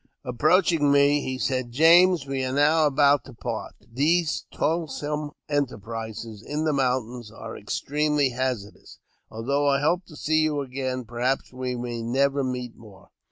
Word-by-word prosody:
Approaching 155 +4 +3
me, 145 +1 +4
he 130 -1 -4
said, 130 -2 -2
"James, 165 +3 +5
we 135 -1 -2
are 130 - -2
now 150 +3 +4
about 145 0 +3
to 135 - -12
part; 115 -1 -5
these 155 +8 0
toilsome 150 -2 -2 0.2
enterprises 115 -5 -4
in 150 +6 -3
the 155 - +1
mountains 125 -4 -1
are 110 - -9
ex - - -4
tremely 150 -2 +1
hazardous; 125 -5 -4 0.3
although 140 +6 -1
I 140 0 +2
hope 170 +5 +1
to 155 - -13
see 155 +2 +1
you 150 -2 0
again, 130 -1 -4
perhaps 125 +4 -2
we 125 0 -3
may 120 -1 -4
never 135 +4 +1
meet 125 -2 -4
more. 105 -4 -16
135 Hz, 155 wpm, -25 LUFS, 125-150 Hz, 0.3 s, James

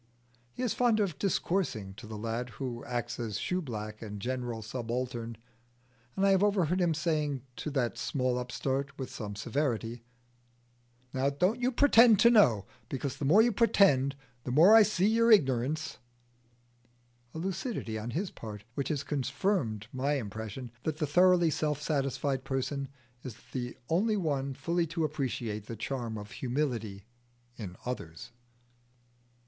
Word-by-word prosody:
He 250 - -5
is 245 - +1
fond 240 -3 +3
of 195 -8 -1
discoursing 170 - -1
to 105 +3 -11
the 110 0 -6
lad 115 +3 -3
who 120 -3 -4
acts 120 0 -3
as 110 -4 -3
shoe 180 +9 -1
black 110 -6 -6
and 105 -2 -6
general 120 0 -3
subaltern, 120 0 -4 0.8
and 195 - +2
I 195 - +5
have 190 -1 +4
overheard 185 -3 +2
him 170 -3 +2
saying 150 -5 -1
to - - -4
that 135 -5 -1
small 130 -3 0
upstart, 135 +3 -3
with 130 -2 -5
some 105 -3 -6
severity, 120 0 -2 1.1
"Now 135 +1 +1
don't 180 - +1
you 250 +1 +2
pretend 235 -4 +6
to 235 - +7
know, 120 - +5 0.2
because 135 0 -3
the 145 - -3
more 195 +11 +6
you 240 - +3
pretend 185 - +4 0.3
the - - -5
more 165 - +7
I 225 - +10
see 205 -3 +2
your 230 +1 +4
ignirance" 150 - +2 1.4
a - - -4
lucidity 190 - -3
on 110 +3 -5
his 180 +9 -2
part 105 -2 -8
which 140 +1 -2
has 145 -3 -1
confirmed 140 - -1
my 135 +3 0
impression 110 0 -5
that 155 -1 -2
the 155 - 0
thoroughly 175 +2 +4
self 150 -1 -1
satisfied 140 -2 -1
person 135 +1 -2 0.3
is 125 -4 -7 0.2
the 125 -2 -4
only 210 +6 +2
one 140 -6 -1
fully 170 +2 0
to 165 +1 -2
appreciate 120 -8 -3
the 115 - -5
charm 115 -1 -4
of 105 0 -8
humility 120 -7 -2 0.5
in 95 -7 -7
others. 85 -8 -6
135 Hz, 155 wpm, -30 LUFS, 120-170 Hz, 1.4 s, I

